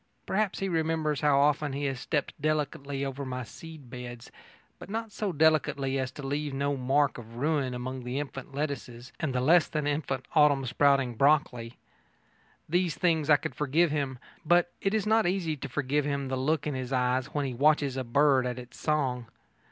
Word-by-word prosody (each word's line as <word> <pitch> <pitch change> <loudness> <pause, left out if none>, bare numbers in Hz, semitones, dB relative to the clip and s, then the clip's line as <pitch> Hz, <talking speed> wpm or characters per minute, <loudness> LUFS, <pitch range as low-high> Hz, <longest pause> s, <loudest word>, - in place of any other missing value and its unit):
Perhaps 205 0 0
he 195 - -2
remembers 160 -3 0
how 145 -2 +4
often 145 0 +2
he 145 +1 -2
has 135 -2 -2
stepped 145 +2 -2
delicately 145 -2 -1
over 135 +1 -4
my 130 -1 -4
seed 155 0 -12
beds, 120 -2 -8 0.5
but - - -10
not 225 +1 -4
so 205 -1 -2
delicately 145 -4 +2
as 130 -1 -1
to 145 +1 -9
leave 145 0 -2
no 140 +1 0
mark 135 +1 +1
of 115 0 -12
ruin 140 -1 0
among 130 +1 -5
the 125 +3 -3
infant 135 -2 -6
lettuces 135 -4 -5
and 155 - -1
the 125 - 0
less 160 +6 +5
than 150 -2 -2
infant 145 -3 -2
autumn 145 -3 +4
sprouting 135 0 +2
broccoli. 125 -3 +1 0.9
These 175 0 +1
things 160 -4 +1
I 150 - +8
could 155 +2 -5
forgive 150 +3 +2
him, 140 -4 -2 0.3
but 175 +1 +3
it 195 +2 +1
is 215 - 0
not 220 -2 +3
easy 175 -4 0
to 140 +1 -6
forgive 145 +2 0
him 140 -2 -2
the 130 - -1
look 150 +3 0
in 150 - -1
his 130 -1 -4
eyes 125 0 +1
when 145 -2 -2
he 130 - -3
watches 140 +1 +2
a 130 - -2
bird 130 +1 +3
at 125 0 -3
its 125 0 -10
song. 130 -6 0
140 Hz, 190 wpm, -28 LUFS, 130-155 Hz, 0.9 s, I